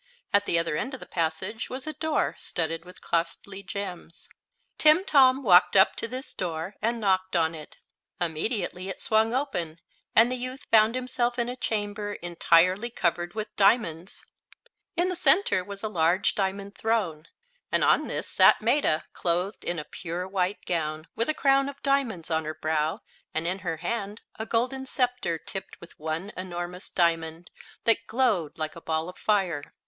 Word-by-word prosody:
At 200 0 +4
the 170 - +2
other 165 -2 0
end 265 +1 -3
of - - -10
the - - -9
passage 180 +7 -2
was 255 +1 -6
a 310 - -3
door 315 0 0
studded 165 0 -3
with 180 - -14
costly 170 +4 -2
gems. 190 -4 -7 0.5
Timtom 285 -5 +5
walked 180 -4 +6
up 190 - +6
to - - -1
this 255 +4 -6
door 170 +1 -4
and 230 +2 0
knocked 190 -3 +1
on 165 -1 +2
it. 155 -2 -10 0.4
Immediately 180 +2 -2
it 190 - -5
swung 220 +1 +2
open, 205 - -2 0.4
and 230 +3 +6
the 255 - -1
youth 255 +2 -6
found 220 +1 +6
himself 250 -1 -1
in 235 -1 0
a 250 - -4
chamber 205 -3 -3
entirely 175 +4 +2
covered 175 -4 -1
with 215 -1 -5
diamonds. 195 -4 +1 0.7
In 350 +1 +2
the 365 - -2
center 360 - +3
was 200 +2 -8
a - - 0
large 175 -1 +2
diamond 200 0 -3
throne, 185 -9 -1 0.4
and - - +2
on - - +4
this - - -3
sat - - +6
Maetta, 160 - +2
clothed 180 +4 -1
in 175 - -2
a 150 - -3
pure 175 +3 -5
white 190 0 -1
gown, 155 -2 -2
with 230 +4 +1
a 310 - +2
crown 275 0 +3
of 280 0 -10
diamonds 250 - 0
on 160 0 +1
her 155 0 -4
brow 155 0 -1 0.3
and 160 +1 0
in 185 +3 -1
her 170 -4 -3
hand 210 +3 -4 0.2
a 220 - -4
golden 255 +4 -1
scepter 250 -10 -1
tipped 190 +4 -7
with 170 - -13
one 160 +6 -3
enormous 180 0 -6
diamond 165 -1 0 0.3
that 230 0 +3
glowed 220 - +1
like 155 -1 -4
a 170 - -10
ball 160 0 -2
of 180 - -10
fire. 185 -9 0
190 Hz, 175 wpm, -27 LUFS, 170-230 Hz, 0.7 s, walked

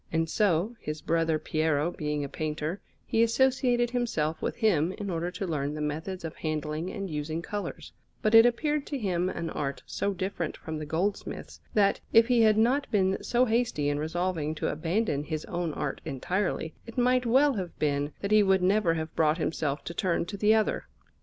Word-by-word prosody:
And 165 0 +1
so, 200 +4 +1
his 150 +1 -5
brother 165 0 +1
Piero 155 +1 0
being 150 -3 -2
a - - -3
painter, 155 +5 -3 0.2
he 225 - +1
associated 245 0 +2
himself 165 -11 -1
with - - -2
him 185 -8 +2
in 200 -1 -5
order 170 +1 -1
to 185 +2 -4
learn 150 -4 -2
the - - -5
methods 160 +5 -3
of 160 - -6
handling 155 +2 -3
and 195 0 -4
using 155 +1 -3
colours; 205 +2 -5 0.3
but 215 - +2
it 225 0 +10
appeared 285 +5 +1
to 285 - -3
him 185 -6 0
an 165 -3 -4
art 140 -2 -3
so 200 - -1
different 185 -3 -3
from 160 -1 -6
the 155 - -6
goldsmith's, 180 +7 -3
that, 200 -2 +3
if 225 +2 +6
he 245 -2 +4
had 215 -1 +5
not 255 +6 +2
been 190 -3 +1
so 245 +1 +3
hasty 225 -11 +1
in 145 0 -1
resolving 160 -1 -1
to - - -1
abandon 165 -1 -1
his 155 0 -4
own 175 -2 -2
art 145 -2 -3
entirely, 160 +3 -2
it 230 - -10
might 250 0 +3
well 270 +4 +5
have 185 -6 -5
been 145 -1 0
that 200 - -3
he 215 0 +7
would 190 -2 +3
never 185 -3 +3
have 160 -1 -4
brought 155 0 +3
himself 155 -3 -2
to 170 - -6
turn 170 -1 0
to 200 - -6
the 210 +2 +3
other. 220 -1 0
175 Hz, 195 wpm, -28 LUFS, 155-215 Hz, 0.3 s, it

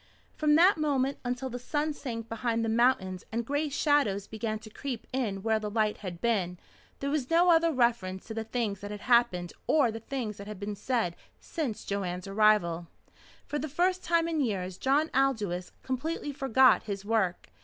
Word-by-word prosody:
From 300 -1 +3
that 350 +2 +6
moment 280 -2 0
until 245 +1 -2
the 245 - -4
sun 295 +4 -1
sank 230 -6 -6
behind 230 0 -1
the - - -1
mountains 220 -6 +2
and 230 +1 -2
gray 290 +4 0
shadows 280 -9 +2
began 220 0 -3
to 215 0 -12
creep 250 -1 -5
in 210 -7 -2
where 220 -1 +2
the 210 -1 -4
light 215 0 +1
had 180 -4 -7
been, 190 -6 0 0.4
there 280 0 -2
was 285 -4 -1
no 345 +2 +5
other 330 0 +4
reference 235 -8 0
to 220 - -6
the 225 0 -3
things 220 -3 -2
that 205 +1 -7
had 205 0 -6
happened 235 -8 +2
or 280 -7 +4
the 225 - -6
things 225 -3 -4
that 200 - -9
had 210 -3 -7
been 205 0 -4
said 205 -5 -1 0.2
since 285 - -4
Joanne's 185 -3 -3
arrival. 195 -5 +2 0.6
For 295 - -3
the 310 - -4
first 360 +5 +1
time 335 -1 +2
in 320 -3 0
years 190 -7 -2
John 290 +4 +2
Aldous 215 -10 0
completely 290 +3 -3
forgot 265 -2 +4
his 200 -2 -5
work. 210 -5 0
230 Hz, 185 wpm, -29 LUFS, 205-280 Hz, 0.6 s, that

